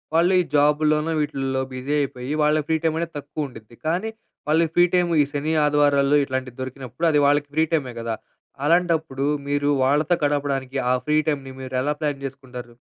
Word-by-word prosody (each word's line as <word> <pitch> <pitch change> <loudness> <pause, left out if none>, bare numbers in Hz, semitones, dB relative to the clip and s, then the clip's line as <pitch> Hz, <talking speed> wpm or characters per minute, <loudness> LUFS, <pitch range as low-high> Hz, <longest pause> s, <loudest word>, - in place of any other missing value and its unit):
వాళ్ళు 175 +3 +4
ఈ - - -1
జాబులోనో, 150 +2 +3
వీటిల్లో 135 -2 -1
బిజీ 130 +3 -3
అయిపోయి 130 0 -4
వాళ్ళ 150 +1 +3
ఫ్రీ 160 - +2
టైమ్ 160 -1 +1
అనేది 170 0 -4
తక్కువ 145 +1 -4
ఉంటుంది. 115 -2 -14
కానీ 185 +7 0 0.4
వాళ్ళు 165 +2 +4
ఫ్రీ 175 0 +6
టైమ్ 180 -1 +3
ఈ - - +5
శని, 150 +2 -2
ఆదివారాల్లో 145 -1 +3
ఇట్లాంటివి 130 -1 -4
దొరికినప్పుడు 130 +3 -5
అది 150 - +3
వాళ్ళకి 145 0 +2
ఫ్రీ 160 - +4
టైమే 135 -6 0
గదా! 115 -1 -2 0.5
అలాంటప్పుడు 160 -5 +1 0.2
మీరు 145 0 0
వాళ్ళతో 150 +6 +2
గడపడానికి 140 -2 -1
ఆ - - +4
ఫ్రీ 150 0 +3
టైమ్ 145 -3 0
ని 130 - -7
మీరు 130 0 -6
ఎలా 145 +2 0
ప్లాన్ 145 -2 -2
చేసుకుంటారు? 125 -3 -9
145 Hz, 175 wpm, -23 LUFS, 130-155 Hz, 0.5 s, ఫ్రీ